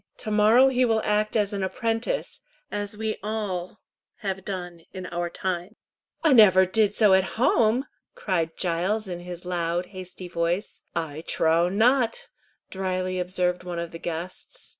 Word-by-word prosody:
To 220 - -4
morrow 220 +5 +6
he 255 -1 +2
will 225 -2 +2
act 210 +1 +1
as 210 -2 +1
an 200 - -2
apprentice, 225 - -2 0.3
as 205 0 -4
we 220 0 -2
all 205 -3 -4 0.4
have 190 -2 -3
done 180 -3 -5
in 185 -1 -6
our 175 0 -3
time." 185 +3 -4 0.5
"I 315 -4 +5
never 190 -6 +7
did 210 +2 +2
so 210 -4 +5
at 190 +2 +2
home!" 235 +1 +3 0.3
cried 165 -4 -1
Giles, 185 +5 0
in 175 -2 -5
his 175 0 -8
loud, 175 0 -1
hasty 185 -1 -8
voice. 175 +3 -2
"I 160 -2 -3
trow 165 +2 +2
not," 230 +4 +2 0.4
dryly 185 -1 -2
observed 180 0 -1
one 175 -1 -5
of 170 0 -4
the 165 - -8
guests. 175 - -6
190 Hz, 155 wpm, -25 LUFS, 175-215 Hz, 0.5 s, never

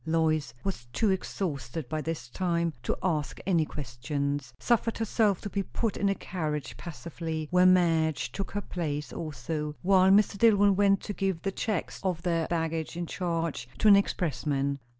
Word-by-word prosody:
Lois 155 -4 +1
was 190 -11 -3
too 215 - +2
exhausted 155 -7 -3
by 155 +4 -2
this 160 -6 -4
time 170 +1 0
to - - -1
ask 155 -6 -1
any 170 -5 +3
questions; 140 +1 -3
suffered 235 -1 +1
herself 215 -3 +1
to - - -4
be 200 - 0
put 220 +2 -2
in 200 - +1
a 195 - +1
carriage 150 -10 -4
passively, 160 +1 -5
where 180 0 +6
Madge 165 -5 +3
took 195 - -4
her 205 - -3
place 150 -6 -4
also, 150 0 -4
while 190 0 +5
Mr. 200 0 +4
Dillwyn 205 -3 +5
went 195 0 +4
to 205 - -5
give 190 -4 -1
the 195 - 0
checks 205 -2 -2
of 180 -3 -2
their 165 -3 +1
baggage 165 -1 -2
in 175 - -2
charge 165 -8 -2
to - - +2
an 205 - +10
expressman. 140 -7 0
165 Hz, 170 wpm, -29 LUFS, 150-195 Hz, -, an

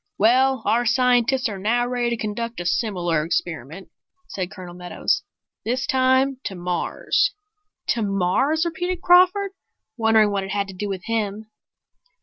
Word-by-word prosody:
"Well, 260 +5 +3
our 235 +2 +2
scientists 250 +1 +3
are 200 -3 -6
now 235 +5 +1
ready 245 -1 -1
to 235 - -1
conduct 230 +1 -4
a 175 - -5
similar 175 -5 0
experiment," 165 +1 -4 0.4
said 185 -2 -4
Colonel 180 -3 -10
Meadows. 180 0 -1 0.4
"This 250 +3 -1
time 260 +1 +2
to 195 - -4
Mars." 175 0 0 0.6
"To 235 - +1
Mars!" 210 - +1
repeated 355 +2 -3
Crawford, 370 +3 +5 0.5
wondering 220 -2 +4
what 200 -1 -1
it 195 - -7
had 200 0 -1
to - - -8
do 205 +2 -4
with 190 -2 -4
him. 215 -1 -3
220 Hz, 145 wpm, -22 LUFS, 190-255 Hz, 0.6 s, Crawford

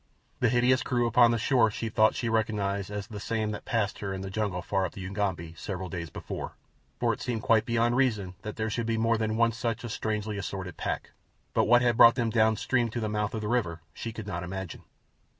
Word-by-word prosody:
The - - +3
hideous 125 +1 +3
crew 120 -1 +1
upon 120 +1 +5
the 115 - +2
shore 115 0 +3
she 115 +2 -4
thought 110 0 +3
she 120 - -2
recognized 105 -3 0
as 105 -1 -4
the 105 -1 -8
same 110 0 -1
that 105 - -3
had - - -17
passed 110 -4 -1
her 100 -1 -3
in 95 - -5
the 95 0 -5
jungle 100 -3 -2
far 95 -1 0
up 95 - -3
the 95 - -8
Ugambi 95 -5 -2
several 95 +2 -5
days 85 -1 -5
before, - - -6 0.5
for - - +2
it - - -8
seemed 115 -3 -2
quite 110 -1 +4
beyond 120 0 +2
reason 110 -8 +1
that 105 - -6
there 110 0 -2
should 115 +1 -2
be 115 -1 0
more 115 0 +2
than 110 0 -1
one 115 0 +4
such 115 +1 -3
a 120 - -5
strangely 105 -1 -2
assorted 95 -2 -5
pack; - - -3 0.4
but - - +3
what 120 +1 +5
had 120 -2 +2
brought 115 0 +8
them 115 -2 0
down 110 -1 +4
stream 120 +2 +1
to 120 - -4
the 110 -2 -2
mouth 105 +1 -1
of 110 - -3
the 105 - -3
river 105 -9 0
she 115 - -5
could 110 -1 -7
not 90 -4 -4
imagine. 95 0 -6
110 Hz, 240 wpm, -28 LUFS, 100-115 Hz, 0.5 s, brought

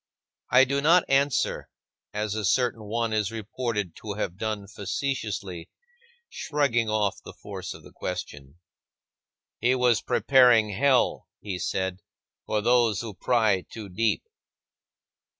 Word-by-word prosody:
I 125 +2 +7
do 140 +2 0
not 170 +4 +5
answer, 135 0 +1 0.4
as 105 0 -2
a 110 0 -3
certain 115 +1 +1
one 115 +1 -1
is 105 -2 0
reported 110 -4 -3
to 105 -2 -6
have 100 -4 -3
done 105 0 -3
facetiously 100 -5 -4 0.6
(shrugging 135 -7 0
off 105 -2 0
the - - -10
force - - -7
of - - -14
the - - -14
question). 70 0 -6 1.0
"He 125 +2 +3
was 125 -3 +3
preparing 125 -5 +4
hell," 130 +4 +2
he 95 -3 -5
said, 95 0 -2 0.5
"for 105 - 0
those 120 -2 +3
who 115 -3 -6
pry 110 -3 +2
too 110 -3 -8
deep." 110 +5 0
110 Hz, 130 wpm, -26 LUFS, 100-125 Hz, 1.0 s, I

